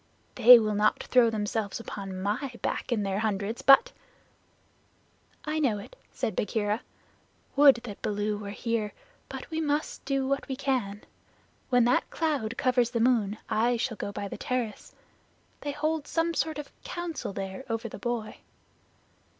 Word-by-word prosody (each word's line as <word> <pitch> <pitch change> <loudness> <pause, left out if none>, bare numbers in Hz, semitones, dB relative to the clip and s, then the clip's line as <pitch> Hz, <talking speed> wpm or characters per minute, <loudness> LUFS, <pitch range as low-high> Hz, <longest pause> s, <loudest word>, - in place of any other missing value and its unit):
They 245 0 +9
will 215 -2 0
not 210 +1 +2
throw 245 -2 +4
themselves 210 -1 -2
upon 195 -4 -6
my 245 +6 -2
back - - -2
in 220 -3 +1
their 195 0 -1
hundreds, 215 +1 -2
but 455 - +7 0.8
" - - -38 0.7
"I 310 +1 -1
know 250 -9 +2
it," 205 - -10 0.2
said 215 - -3
Bagheera. 210 +1 -1 0.7
"Would 280 -1 +8
that 210 -5 -8
Baloo 210 0 -1
were 205 -1 -6
here, 220 0 -2 0.4
but - - -7
we 320 0 -1
must 300 0 -1
do 275 -1 0
what 275 0 -1
we 265 - -3
can. 255 -7 -2 0.7
When 245 -2 +4
that 245 - +2
cloud 280 -9 -1
covers 250 -2 +2
the 240 -1 -2
moon 225 -4 +2
I 235 +2 +2
shall 230 0 -2
go 200 - -4
to 200 - -4
the - - -7
terrace. 245 -4 -3 0.6
They 290 - -3
hold 305 +1 -2
some 335 0 0
sort 315 -2 -1
of 295 - -7
council 345 - -4
there 195 +4 -5
over 225 +1 -2
the 210 - -9
boy." 235 0 -3
235 Hz, 160 wpm, -28 LUFS, 210-275 Hz, 0.8 s, They